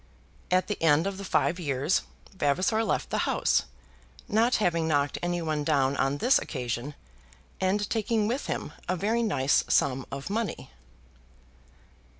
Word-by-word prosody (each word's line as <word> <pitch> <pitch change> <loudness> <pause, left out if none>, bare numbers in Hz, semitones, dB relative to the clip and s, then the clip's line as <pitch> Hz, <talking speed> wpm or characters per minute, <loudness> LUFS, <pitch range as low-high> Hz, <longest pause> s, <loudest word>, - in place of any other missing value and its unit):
At 185 0 +3
the 210 - -4
end 160 0 +4
of 195 -1 -3
the - - -5
five 180 -2 +1
years 140 +1 0 0.3
Vavasor 185 +8 +1
left 215 - -1
the - - 0
house, - - +2 0.6
not 230 +4 +3
having 170 -5 +1
knocked 145 -2 +1
any 175 -1 -1
one 155 -2 -1
down 135 -1 +2
on 135 +1 0
this 250 - +4
occasion, 125 +1 -4 0.6
and 195 +2 +1
taking 220 -1 0
with 250 +5 -2
him - - -4 0.2
a 185 - +2
very 220 +6 0
nice 145 - +2
sum 135 -1 +1
of 140 +7 -5
money. 225 0 -3
175 Hz, 150 wpm, -27 LUFS, 145-210 Hz, 0.6 s, end